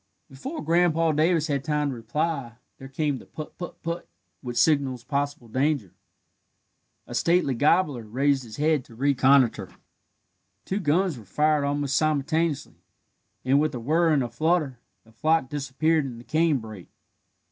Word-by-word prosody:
Before 275 - -6
Grandpa 165 -1 +3
Davis 160 +1 +2
had 140 -4 -1
time 150 -1 0
to - - -5
reply, 140 +1 -2 0.3
there 135 - -9
came 140 0 -2
the - - -15
"put 155 - -9
put 175 - -8
put" 170 +1 -4 0.3
which 120 -2 -5
signals 130 -2 +2
possible 140 -2 -3
danger. 130 - -1 1.1
A - - -9
stately 170 -5 +2
gobbler 145 0 +2
raised 135 +5 +1
his 115 -3 -10
head 150 -2 +2
to 115 - -16
reconnoitre; 130 -5 +3 1.0
two 195 - -2
guns 170 -3 +1
were 110 - -14
fired 150 +4 +1
almost 140 -2 0
simultaneously, 155 0 0 0.6
and, 135 +2 +4
with 155 -2 0
a - - -4
whir 160 +8 +2
and 145 -4 +3
a 120 - -4
flutter, 155 -1 0 0.2
the 115 - -22
flock 155 +5 +1
disappeared 150 +2 0
in 125 -3 -6
the 120 - -11
cane 155 +1 +2
brake. 110 -6 -10
145 Hz, 155 wpm, -25 LUFS, 130-160 Hz, 1.1 s, and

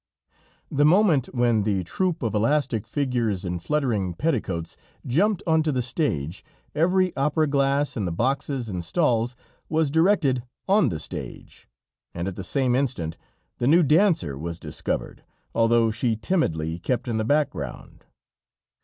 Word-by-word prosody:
The 145 - +2
moment 160 - +4
when 120 -3 +1
the 100 -3 0
troop 175 - -1
of 115 - -1
elastic 115 0 +1
figures 120 -9 -1
in 90 0 -2
fluttering 110 - -1
petticoats 100 - -2 0.3
jumped 185 - +1
onto 160 -1 +2
the 130 -3 0
stage, 100 - -2 0.3
every 180 +3 +2
opera 150 +3 +1
glass 140 0 +1
in 105 - -2
the 90 - -2
boxes 135 - -1
and 90 -4 -4
stalls 120 - +1 0.3
was 155 -2 +1
directed 160 -6 +3 0.3
on 200 +2 +4
the 80 - -3
stage, - - -8 0.5
and 85 +2 -3
at 95 - -4
the 95 - -6
same 130 +2 +1
instant 125 - -1 0.4
the 120 - +1
new 170 +5 +6
dancer 155 - +3
was 85 +1 -5
discovered, - - -4 0.3
although 115 0 +3
she 115 +1 0
timidly 85 - -1
kept 125 +8 -2
in 115 -2 -1
the - - 0
background. 110 - -2
125 Hz, 145 wpm, -24 LUFS, 100-150 Hz, 0.5 s, new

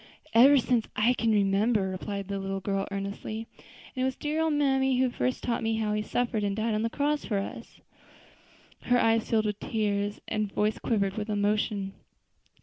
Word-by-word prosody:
"Ever 270 +5 +7
since 245 -3 +1
I 225 +4 +3
can 230 -2 0
remember," 200 0 +2
replied 195 +1 -4
the 200 0 -3
little 195 0 -3
girl 195 0 -2
earnestly; 200 +3 -5 0.5
"and 255 - -2
it - - +2
was 260 -1 0
dear 305 +2 -2
old 320 -1 +1
mammy 270 -3 +2
who 255 -1 +2
first 255 +1 -2
told 235 -2 -1
me 225 0 0
how 215 -1 -1
He 210 - 0
suffered 225 0 -1
and 200 -1 0
died 220 +1 0
on 215 - 0
the 230 - 0
cross 290 +3 0
for 205 - -1
us." 230 +4 -6 1.0
Her 245 - +2
eyes 225 -1 +2
filled 220 -1 +2
with 210 -1 -2
tears 205 -2 -1
and 215 -1 -1
her - - -23
voice 210 +1 +1
quivered 200 -4 0
with 215 0 -3
emotion. 205 -1 0
215 Hz, 195 wpm, -28 LUFS, 200-245 Hz, 1.0 s, Ever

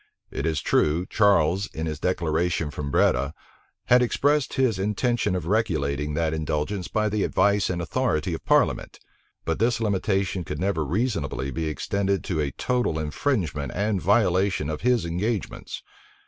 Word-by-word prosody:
It 70 - -2
is 80 -2 0
true, 80 +4 +2
Charles, 100 -2 +3
in 80 - -3
his 75 -2 -4
declaration 85 -2 0
from 75 -1 -5
Breda, 70 +2 +2 0.5
had 125 +1 +5
expressed 145 +4 +1
his 125 -7 +1
intention 105 +1 0
of 90 -3 -3
regulating 75 -8 0
that 80 -1 0
indulgence 80 +4 -2
by 110 0 0
the 105 -1 0
advice 100 0 +2
and 90 -2 -2
authority 90 -3 -1
of 80 - -5
parliament; - - +1 0.5
but - - -1
this 115 +1 +2
limitation 95 -3 0
could 75 -2 -5
never 90 -4 0
reasonably 75 - -2
be 80 +1 -2
extended 100 +5 -1
to 85 -4 -2
a 75 -2 0
total 125 - -1
infringement 75 - -2
and 100 -1 0
violation 95 -6 +2
of 75 - -5
his 125 -5 +2
engagements. 95 +5 -3
90 Hz, 150 wpm, -25 LUFS, 80-105 Hz, 0.5 s, had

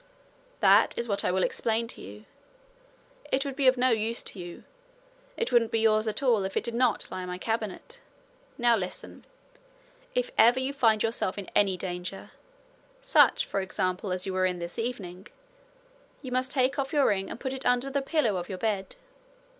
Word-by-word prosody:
'That - - +5
is 235 - -2
what 200 -2 0
I - - +1
will 185 0 +1
explain 230 0 0
to - - -9
you. 105 +3 -11 1.1
It 270 +2 +1
would 275 -2 -4
be 275 -1 +2
of 255 0 +5
no 255 +1 +3
use 225 +1 -1
to 195 - -8
you 175 -1 -8 0.7
it 465 - -1
wouldn't 235 -2 +4
be 225 -1 0
yours 215 0 +3
at 215 +6 -2
all 235 -6 +3
if 190 0 -3
it - - 0
did 235 0 -4
not 240 -3 +1
lie 185 - -4
in 180 - -6
my 180 0 -4
cabinet. 225 - -4 0.6
Now 240 -1 +4
listen. 185 -4 -6 0.9
If - - 0
ever 240 +3 +6
you 260 +2 -2
find 225 -6 +3
yourself 225 -4 -1
in 200 - -7
any 195 -2 +3
danger 180 +1 -6 0.7
such, - - +5
for 195 - -2
example, 185 0 -2
as 185 0 -1
you 190 - -3
were 185 0 +2
in 180 -1 -2
this 170 0 -6
same 225 - -2
evening 190 -5 -8 1.0
you 260 - -6
must 255 +1 0
take 265 +1 +1
off 270 0 -2
your 290 -3 +3
ring 195 -1 +1
and - - -7
put 260 0 -3
it 265 0 -6
under 250 +2 +1
the 280 0 0
pillow 270 - +1
of 175 - -5
your 190 - -4
bed. 195 -2 -2
225 Hz, 200 wpm, -28 LUFS, 190-255 Hz, 1.1 s, ever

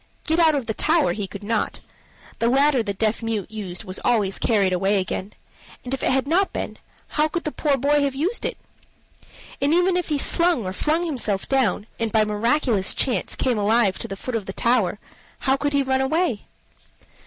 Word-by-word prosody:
Get 320 +1 +2
out 320 -2 +5
of 270 -4 -2
the 220 - -2
tower 315 +6 +2
he 205 -2 -4
could 200 +1 -9
not: 215 0 -1 0.6
the 230 - +2
ladder 275 0 +3
the 210 -3 -2
deaf 220 +3 0
mute 220 -2 -3
used 195 -3 -5
was 185 -2 -5
always 210 -5 +1
carried 200 -5 +2
away 195 +2 +2
again; 190 +2 -4 0.5
and 250 - -4
if 270 - -3
it - - +1
had 265 0 +2
not 360 +7 +2
been, - - -5 0.3
how 300 0 +1
could 340 +2 -3
the 305 - -3
poor 290 -2 0
boy 290 +3 +2
have 280 -2 0
used 355 - -1
it? - - -2 1.0
And 285 +4 +3
even 360 +1 +3
if 360 -2 0
he 300 - +1
slung 335 - +2
or 185 - -3
flung 315 - 0
himself 225 - -1
down, 255 -7 +1
and 225 -1 -1
by 215 0 +3
miraculous 220 0 +1
chance 240 -9 0
came 245 -4 0
alive 210 -1 +2
to - - -4
the 195 - -6
foot 255 - -5
of 215 -4 -3
the 195 - -4
tower, 225 -6 +1 0.4
how 265 0 +2
could 290 +1 -2
he 280 -1 +3
run 265 0 +1
away? 270 - 0
245 Hz, 205 wpm, -23 LUFS, 210-295 Hz, 1.0 s, out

